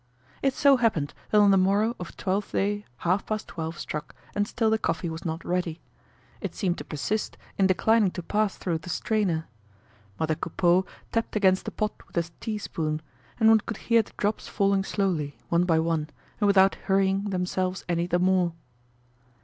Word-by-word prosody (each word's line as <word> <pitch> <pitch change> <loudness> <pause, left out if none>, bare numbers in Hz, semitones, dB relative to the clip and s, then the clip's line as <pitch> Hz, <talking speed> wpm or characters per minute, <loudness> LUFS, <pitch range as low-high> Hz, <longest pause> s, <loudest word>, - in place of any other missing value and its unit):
It 270 -1 +1
so 280 -2 +5
happened 210 - +1 0.2
that 210 - +3
on 205 -1 +7
the 195 - +5
morrow 200 +5 +2
of 180 - -8
Twelfth 195 +2 -1
day 205 +1 0 0.2
half 185 +3 +2
past 215 0 -3
twelve 160 0 -5
struck 150 0 -5 0.2
and 205 0 0
still 225 -2 +1
the 220 - +2
coffee 170 -5 -1
was 160 0 -6
not 160 0 -3
ready. 175 -2 -1 0.6
It - - -4
seemed 180 -5 -1
to - - -5
persist 205 +8 -3 0.2
in 195 - +5
declining 215 +2 +3
to 180 - -5
pass 210 +2 0
through 170 -3 -2
the 160 - -10
strainer. 180 -4 0 0.7
Mother 160 0 +1
Coupeau 175 +4 +1 0.2
tapped 230 -1 -1
against 190 -3 +3
the - - -3
pot 215 -1 -1
with - - -10
a 170 0 +1
tea 220 -2 -3
spoon; 155 -6 -3 0.4
and 220 - +5
one 220 0 +7
could 220 0 -6
hear 230 -1 +3
the 215 - -14
drops 205 +1 -1
falling 195 -1 +2
slowly, 175 -9 -1
one 170 +1 +3
by 165 -3 +3
one, 160 -1 0 0.3
and 205 - +3
without 195 -1 +5
hurrying 195 +1 +2
themselves 185 -1 -1
any 170 0 0
the 175 - +2
more. 180 -1 +2
190 Hz, 185 wpm, -27 LUFS, 170-210 Hz, 0.7 s, on